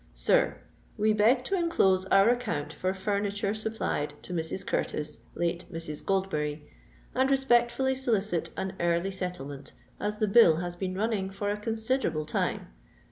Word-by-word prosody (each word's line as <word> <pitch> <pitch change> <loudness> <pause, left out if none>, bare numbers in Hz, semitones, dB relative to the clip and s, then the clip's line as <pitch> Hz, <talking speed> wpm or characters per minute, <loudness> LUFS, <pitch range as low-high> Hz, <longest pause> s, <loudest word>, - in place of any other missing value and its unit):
_ - - -30
"SIR, - - +2 0.4
"We 215 0 +3
beg 230 +5 +4
to 390 - -1
enclose 195 - +2
our 195 +2 +5
account 165 -12 -2
for 185 +4 -1
furniture 200 +1 -1
supplied 215 -9 -2
to 180 - -7
Mrs. 165 +2 -2
Curtis, 150 0 -2 0.2
late 170 +1 -1
Mrs. 165 -3 -5
Goldberry, 155 -6 -1 0.5
and 260 +1 +2
respectfully 265 -1 +3
solicit 215 -9 0
an 190 0 -3
early 170 +2 +1
settlement, 145 -7 -5 0.3
as 210 +1 -2
the 215 -1 +1
bill 195 -6 +7
has 175 +1 -4
been 185 +1 -3
running 205 -2 -1
for 205 +1 -2
a 205 - -2
considerable 220 - -1
time. 150 - -1
195 Hz, 150 wpm, -28 LUFS, 170-220 Hz, 0.5 s, bill